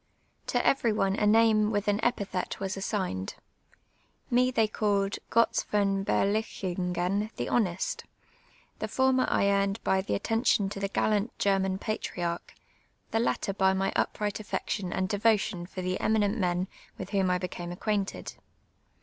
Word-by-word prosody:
To - - 0
every 270 -4 +3
one 195 -2 +1
a 210 - +1
name 215 -1 +5
with 205 -1 -1
an 205 +1 +1
epithet 200 -6 -1
was 195 0 -2
assi^ied. 190 - -3 1.0
Me 250 +1 +4
they 225 -3 +2
called 205 -2 0
" - - -41
Gotz 230 0 +3
von 195 -1 +1
IJer - - +2 0.5
lichiuf^cn 180 +4 -1
the - - -3
honest.' 190 -6 0 0.7
The - - -2
former 260 -1 +2
I 200 - +3
earned 200 +1 +1
by 190 0 +2
the 195 - -2
atten 225 +3 -1
tion 205 -6 +3
to 200 - -6
the 200 0 -1
«:allant 215 +1 +2
German 195 -1 +1
])atriarch, 175 -5 -3 0.6
the 225 - +1
latter 215 -3 0
by 190 -1 +3
my 190 0 0
upri;;ht 210 -1 -1
affection 205 -3 -3
and 190 0 0
devotion 205 -3 +1
for 185 0 -6
the 185 +1 -1
eminent 215 -1 +2
men 180 0 0 0.3
with 190 +1 -7
whom 195 -3 +2
I 180 - +2
be 180 - -3
came 175 -1 -6
accpiainted. 200 +2 -2
200 Hz, 160 wpm, -28 LUFS, 190-215 Hz, 1.0 s, name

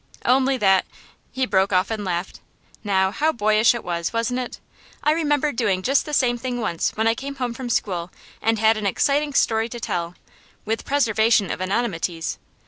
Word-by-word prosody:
'Only 265 +1 +3
that 190 -4 +3 0.3
' - - -36
he 260 0 0
broke 190 -4 +2
off 185 +2 +2
and 215 -2 -3
laughed. 180 -1 -3 0.4
'Now, 190 -2 +2
how 310 +9 +1
boyish 215 -1 +3
it 235 - -5
was, 170 -1 -2
wasn't 230 +2 -1
it? 250 - -6 0.4
I 300 - +4
remember 300 -2 +1
doing 205 -7 0
just 275 +5 +2
the - - -5
same 245 -4 +2
thing 245 -1 -3
once 175 -8 -1
when 220 - +1
I 225 - +4
came 275 +4 -6
home 250 -3 -3
from 245 +1 -6
school 180 -6 -1 0.3
and 225 0 +1
had 220 +1 +3
an 210 -2 -1
exciting 285 +7 +1
story 225 -2 +2
to 240 - -7
tell, 175 -5 -3 0.5
with 225 +1 -2
preservation 225 -6 +2
of - - -4
anonymities. 185 -5 -2
225 Hz, 190 wpm, -22 LUFS, 190-255 Hz, 0.5 s, I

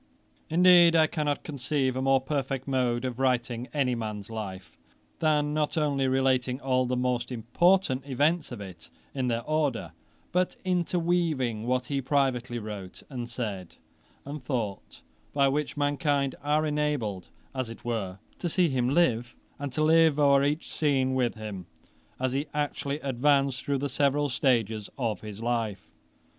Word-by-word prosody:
Indeed 175 0 +7
I 160 -1 +6
cannot 150 -2 -1
conceive 135 -2 -1
a 130 - -1
more 135 0 +4
perfect 135 -1 -3
mode 125 -2 0
of 125 -1 -4
writing 125 -2 0
any 135 -4 +1
man's 110 -2 -5
life, 95 -4 -6 0.4
than 150 -2 +2
not 150 +1 0
only 140 -3 +1
relating 130 -1 +1
all 130 -2 +1
the 125 0 -1
most 125 -1 -1
important 130 - +2
events 145 +5 +1
of - - -6
it 90 -5 -10 0.2
in 130 -2 -1
their 115 -1 -1
order, 140 - -1 0.4
but 180 +1 +1
interweaving 170 -10 0
what 125 0 +1
he 140 -1 -1
privately 130 -3 0
wrote, 105 -4 -7
and 120 -3 -5
said, 105 -7 -5 0.5
and 145 0 -6
thought; 115 -7 -4 0.3
by 140 -1 +4
which 145 +2 -1
mankind 145 -1 +1
are 150 +2 +1
enabled 145 - -1 0.3
as 130 -3 -3
it 115 - -11
were 105 -6 -2 0.2
to 175 - -2
see 175 0 +3
him 125 -2 +1
live, 125 -7 +2 0.2
and 140 -1 -4
to 155 - +1
'live 160 -1 +5
o'er 140 -2 +5
each 150 +3 -1
scene' 135 -4 +1
with 125 -3 +1
him, 105 -5 -7 0.5
as 130 0 0
he 140 +3 -1
actually 145 -1 -2
advanced 135 0 +1
through 140 -1 0
the 140 +2 -1
several 140 +2 +1
stages 115 -5 +1
of 115 -5 -2
his 105 0 -8
life. 115 -5 -2
130 Hz, 155 wpm, -28 LUFS, 120-145 Hz, 0.5 s, Indeed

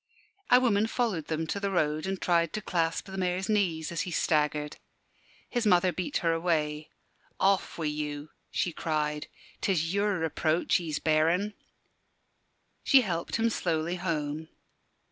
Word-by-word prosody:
A 250 - +7
woman 220 -4 +2
followed 225 - -1
them 160 0 -1
to 200 - -3
the 200 -1 -1
road, 155 -2 0
and 190 -1 -2
tried 170 -2 +2
to 215 - -2
clasp 165 -2 0
the 190 -1 -6
Mayor's 185 +1 -1
knees 180 -7 0
as 170 - -1
he 185 - -3
staggered. 150 -3 0 0.7
His 240 -3 -1
mother 180 -1 +4
beat 185 +11 -2
her 165 - +4
away. 155 -3 -1 0.5
"Off 195 0 +2
wi' 165 - -2
you!" 150 0 -3 0.2
she 175 - -1
cried; 150 -2 -2 0.3
"'tis 170 -3 +1
your 200 -1 +1
reproach 160 0 +1
he's 160 -4 -3
bearin'." 165 +6 +2 1.3
She 270 - +6
helped 170 -7 -2
him 230 0 +2
slowly 170 -2 -1
home. 160 -3 -2
170 Hz, 145 wpm, -29 LUFS, 155-195 Hz, 1.3 s, A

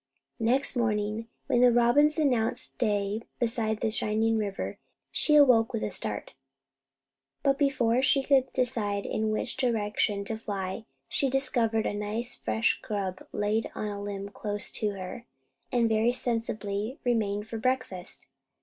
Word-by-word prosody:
Next 250 +6 +2
morning, 215 -1 0 0.2
when 240 - +2
the 250 -1 +7
robins 240 +6 +4
announced 250 -5 0
day 205 -2 0 0.2
beside 225 -3 -1
the 225 - +1
shining 220 +1 +2
river, 205 -3 -3 0.3
she 300 - +3
awoke 255 -5 +6
with 225 - -1
a - - -2
start; 105 - -4 1.1
but 275 0 +2
before 255 -4 +2
she 275 0 +3
could 265 -2 +3
decide 220 -6 -1
in 220 0 -1
which 215 +4 -2
direction 210 -4 0
to 220 +1 -4
fly, 200 0 -4 0.2
she 275 - 0
discovered 240 -4 +2
a - - 0
nice 210 +4 -3
fresh 225 - 0
grub 195 -3 -4
laid 210 +2 0
on 210 - -3
the 205 -1 -5
limb 200 0 -5
close 205 0 -4
to 215 - 0
her, 190 +5 -7 0.5
and 235 -2 +3
very 225 +2 +2
sensibly 225 -2 -2
remained 215 -4 0
for 225 -1 -5
breakfast. 250 -7 -2
225 Hz, 145 wpm, -28 LUFS, 205-245 Hz, 1.1 s, the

